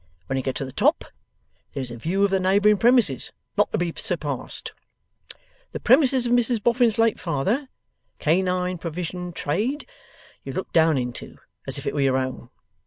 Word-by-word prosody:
When 135 - -3
you 135 - 0
get 130 0 -3
to 135 - -3
the 130 - -8
top, - - +2 0.7
there's 130 -4 -3
a - - -6
view 175 - -1
of 200 - +2
the 190 - +2
neighbouring 200 +2 +3
premises, 235 - +3 0.2
not - - +2
to - - 0
be 175 -2 -1
surpassed. 150 -7 -4 1.0
The - - -4
premises 260 -2 +4
of 240 - -1
Mrs 245 -1 +2
Boffin's 240 -2 +3
late 225 -1 +2
father 195 - -1 0.5
(Canine 180 +2 0
Provision 180 +2 -5
Trade), 220 - -2 0.6
you 135 - -6
look 190 - -5
down 160 -2 +4
into, 125 -1 -5 0.3
as - - +1
if - - -6
they - - -1
was 145 - 0
your 135 -1 +2
own. 130 -2 -4
180 Hz, 175 wpm, -24 LUFS, 140-225 Hz, 1.0 s, premises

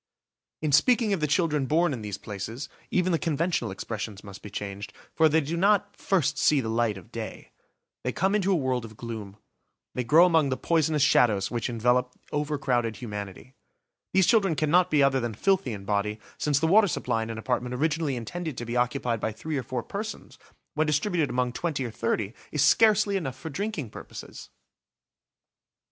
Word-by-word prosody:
In 155 - +1
speaking 230 - +4
of 195 - 0
the 150 - 0
children 150 -3 +1
born 165 +1 +2
in 120 - -5
these 105 -1 -5
places, 110 +7 -6 0.2
even 185 0 +1
the 165 - +2
conventional 160 -6 0
expressions 105 +1 -5
must 100 -1 -10
be 105 - -9
changed, 100 0 -6 0.2
for 160 -1 +4
they 160 +2 +3
do 155 +4 -3
not 205 +3 +2
"first 180 -8 0
see 150 - +4
the 115 -4 -2
light 115 -2 +1
of 95 - -14
day"; - - -7 0.5
they 125 - -1
come 190 +8 +1
into 200 -2 +2
a - - +4
world 130 -6 0
of 110 -1 -11
gloom. 110 -4 -7 0.6
They 125 - -2
grow 155 +8 +6
among 160 -5 +3
the 130 - -1
poisonous 160 -3 +1
shadows 105 -8 +3
which 120 -1 -2
envelope 125 +2 +1 0.2
over 150 0 -1
crowded 120 -5 0
humanity. 105 +1 -7 0.6
These 190 0 +4
children 195 -7 +3
cannot 165 +4 +3
be 145 -2 +4
other 135 -1 +3
than 120 -3 -3
filthy 195 - +1
in 100 -3 -7
body, 105 +1 -1 0.2
since 145 -2 +1
the 160 - +1
water 205 +5 +5
supply 115 -8 -1
in 110 - -4
an 115 - -5
apartment 125 +2 -2
originally 155 0 0
intended 155 +6 -5
to 120 - -4
be 120 +1 -4
occupied 120 -1 0
by 110 - -1
three 155 +8 -5
or 135 - 0
four 125 -1 -4
persons, 215 +2 -7 0.3
when 155 +1 +1
distributed 155 +1 +1
among 125 0 0
twenty 150 -5 -2
or 120 - -5
thirty 110 -2 -1 0.2
is 150 - +1
scarcely 210 -2 +4
enough 135 -8 -4
for 160 - -7
drinking 185 - -4
purposes! - - -10
135 Hz, 190 wpm, -27 LUFS, 115-165 Hz, 0.6 s, grow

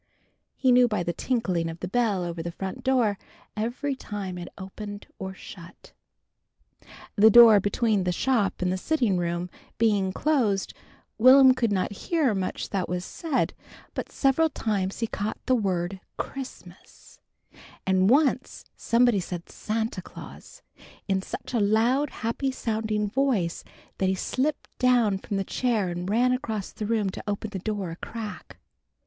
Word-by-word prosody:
He 260 - +2
knew 250 0 +6
by 210 -6 -1
the 175 - -2
tinkling 185 -10 -1
of 165 +1 -8
the 180 - -4
bell 205 -3 +1
over 170 -1 -4
the 170 +1 -4
front 190 +2 -6
door, 240 -7 +2 0.4
every 240 +6 -2
time 200 -7 -6
it 175 - -7
opened 205 +2 -8
or 190 0 -5
shut. 170 -2 -13 1.2
The 220 +1 +7
door 225 -2 +9
between 205 0 +1
the 180 - 0
shop 205 -1 0
and 185 +1 0
sitting 240 - +1
room 175 0 -2 0.3
being 205 -4 +2
closed, 225 -7 +1 0.5
Will'm 260 +2 +8
could 235 -4 0
not 190 0 0
hear 285 - 0
much 190 -2 -3
that 190 -3 -1
was 180 0 -2
said, 320 -6 -1 0.4
but - - -5
several 285 +4 +2
times 200 -6 -2
he - - +2
caught 215 -1 -3
the 255 - +2
word 190 -5 -1 0.2
"Christmas," 270 -1 -9 0.7
and 190 0 +3
once 270 -1 +2
somebody 235 -2 +3
said 175 -1 -6
"Santa 220 -2 -3
Claus," - - -12 0.4
in 190 -1 +1
such 195 - -7
a 235 - +2
loud 230 +7 +2
happy 235 +4 -2
sounding 220 -4 -1
voice 220 -8 0 0.4
that 190 - +2
he 190 - +1
slipped 275 +9 -2
down 240 -6 +3
from 200 0 -4
the 195 - 0
chair 220 -3 0
and 175 +1 -4
ran 245 +4 +3
across 225 -6 -3
the 210 - -5
room 215 -4 +1
to - - -8
open 205 +1 -3
the 190 - -4
door 200 -3 -3
a - - -6
crack. 220 +1 -7
210 Hz, 155 wpm, -26 LUFS, 190-245 Hz, 1.2 s, door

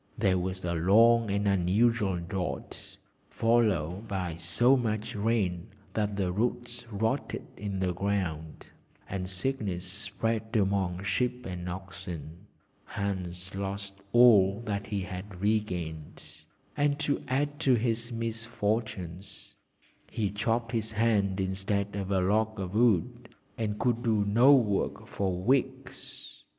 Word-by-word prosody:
There 95 -1 +2
was 95 0 -3
a 85 - 0
long 110 +7 +5
and 100 +1 0
unusual 100 +2 +2
drought, 90 +1 -5 0.3
followed 105 -5 +1
by 90 -5 -3
so 90 +11 +3
much 110 -4 -1
rain 100 -4 0 0.3
that 105 -2 -1
the 95 -3 0
roots 120 +3 -2
rotted 110 +1 -2
in 100 -1 -4
the 95 -1 0
ground, 90 -5 -3 0.4
and 90 -1 -4
sickness 95 -3 -2
spread 110 +4 -3
amongst 95 -2 +1
sheep 125 +1 0
and 90 -1 -5
oxen. 90 -1 -8 0.4
Hans 95 -2 -4
lost 100 0 -4 0.2
all 105 -4 +6
that 100 -1 -3
he 105 -2 -2
had 95 0 -7
re 105 +3 +3
gained, 80 -5 -7 0.3
and 145 -1 +2
to 145 - 0
add 145 +3 0
to 130 -2 +4
his 115 +1 -1
misfortunes, 110 -5 -3 0.5
he 105 -3 -1
chopped 115 +2 -1
his 110 -2 -2
hand 100 -3 +2
instead 95 +1 -1
of 100 -1 -3
a 95 -2 +2
log 110 +3 +1
of 95 -1 -4
wood, 120 +2 +2 0.3
and 105 -2 -2
could 120 +1 +1
do 110 -4 +2
no 115 +7 +6
work 105 -7 0
for 95 -2 -2
weeks. 125 +7 -2
100 Hz, 130 wpm, -29 LUFS, 95-115 Hz, 0.5 s, all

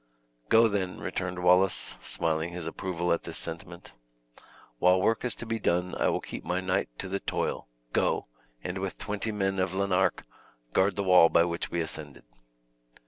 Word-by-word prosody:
"Go, 115 +1 +7
then," 100 -3 -2
returned 90 -1 -4
Wallace, 90 -5 +3
smiling 80 0 -1
his 90 -2 -5
approval 85 +1 -2
of 85 - +2
this - - -5
sentiment, 85 -1 -5 0.9
"while 90 +1 +5
work 115 +4 +1
is 125 - -1
to - - -7
be 115 0 -2
done 90 -1 0
I - - +1
will - - 0
keep - - -7
my 90 +2 -1
knight 95 -3 0
to 95 - -5
the 100 +1 -2
toil; - - -2 0.3
go, - - +1 0.4
and 90 +1 -3
with 95 -1 -4
twenty 105 +1 -3
men 95 -2 0
of 95 0 0
Lanark, 95 -1 +1 0.5
guard 95 0 +3
the 100 - -1
wall 90 -3 +7
by 85 - +5
which 85 -1 -2
we 85 - -1
ascended." 80 -3 -4
90 Hz, 175 wpm, -28 LUFS, 85-95 Hz, 0.9 s, Go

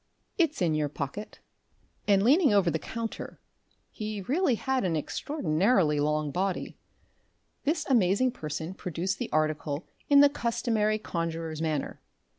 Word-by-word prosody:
"It's 310 - +2
in 165 -3 +2
your 150 -1 0
pocket." 150 +10 -6 0.7
And 200 -1 +4
leaning 285 - +5
over 195 -4 +4
the 160 - -1
counter 230 +5 -6 0.5
he 215 -2 -5
really 275 - +1
had 265 +3 -1
an 175 -4 0
extraordinarily 170 - +1
long 150 0 0
body 190 +4 -2 0.9
this 305 +1 0
amazing 235 0 +3
person 160 - -5
produced 185 +1 -3
the 245 - -4
article 155 0 -1 0.2
in 285 -1 +8
the 285 - +8
customary 225 -4 0
conjurer's 165 -5 -4
manner. 155 -3 -2
195 Hz, 130 wpm, -28 LUFS, 155-240 Hz, 0.9 s, in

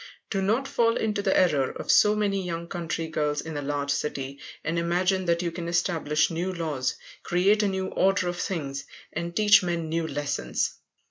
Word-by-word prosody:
Do 195 - 0
not 225 +8 +1
fall 230 -2 +2
into 210 -2 0
the 195 -1 +2
error 145 -8 +3
of - - -2
so 210 0 +6
many 200 -2 0
young 170 -1 -4
country 165 -1 -3
girls 150 -2 -1
in 160 -1 -5
a 145 - -2
large 145 0 -1
city, 140 -1 -3 0.2
and 165 +2 -1
imagine 180 +2 +1
you 175 -1 -1
can 170 0 -5
establish 165 -3 +1
new 175 +3 -2
laws, 155 -7 -2 0.3
create 195 +5 +3
a 210 - +2
new 190 -1 -1
order 195 -1 +2
of 175 0 -2
things, 140 -7 -3 0.3
and 170 +2 -4
teach 210 -1 +6
men 170 -3 -2
new 165 0 -1
lessons. 140 - -1
170 Hz, 185 wpm, -26 LUFS, 150-190 Hz, 0.3 s, so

